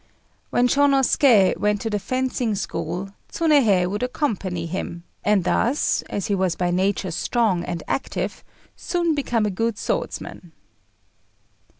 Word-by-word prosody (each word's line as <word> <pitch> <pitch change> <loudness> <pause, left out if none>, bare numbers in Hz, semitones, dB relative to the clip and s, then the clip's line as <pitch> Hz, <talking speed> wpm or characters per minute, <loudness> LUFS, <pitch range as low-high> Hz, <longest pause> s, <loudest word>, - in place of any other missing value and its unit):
When 245 - +3
Shônosuké 270 -6 +4
went 210 0 +1
to 225 - -2
the 210 - 0
fencing 250 +1 -1
school 180 0 -4 0.2
Tsunéhei 260 - +3
would 205 +4 -3
accompany 200 - -2
him, 170 0 -5 0.2
and 210 -3 +3
thus, 240 - +1
as 200 - -3
he 210 - -1
was 185 -3 +1
by 175 -1 0
nature 185 0 0
strong 195 0 0
and 170 -2 -4
active, 270 - -3 0.3
soon 345 -2 0
became 240 -7 0
a 210 - 0
good 225 +3 -1
swordsman. 175 -3 -4
205 Hz, 130 wpm, -23 LUFS, 185-250 Hz, 0.3 s, Shônosuké